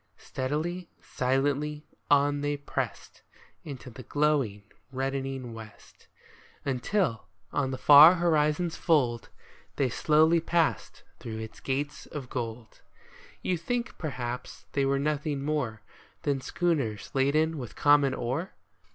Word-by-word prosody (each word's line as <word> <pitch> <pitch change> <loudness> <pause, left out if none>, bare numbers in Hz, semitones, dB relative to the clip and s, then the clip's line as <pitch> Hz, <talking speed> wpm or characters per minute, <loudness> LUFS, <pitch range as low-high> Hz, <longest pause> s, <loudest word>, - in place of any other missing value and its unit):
Steadily, 160 +7 -3
silently, 145 +3 -1 0.2
on 145 0 +3
they 145 0 -1
pressed 145 - -5 0.4
Into 130 -3 -8
the 130 - -10
glowing, 135 -6 0 0.3
reddening 135 -2 -3
west; 110 -2 -13 0.6
Until, 135 - 0 0.3
on 140 -2 0
the 130 - -3
far 150 +6 +9
horizon's 165 0 +1
fold, 125 - +1 0.5
They 135 -2 +1
slowly 155 +6 +4
passed 165 0 0 0.2
through 110 -2 -6
its 110 0 -8
gate 145 +2 -3
of 135 -5 -6
gold. 115 -2 -6 0.6
You 180 -2 0
think, 245 +8 -3
perhaps, 125 -5 -5
they 140 -1 +1
were 140 0 +2
nothing 145 0 -1
more 140 -8 -2 0.4
Than 140 -2 0
schooners 135 - -1
laden 155 +4 +2
with 120 -4 -7
common 145 -2 +4
ore 135 +10 -3
140 Hz, 115 wpm, -28 LUFS, 130-155 Hz, 0.6 s, far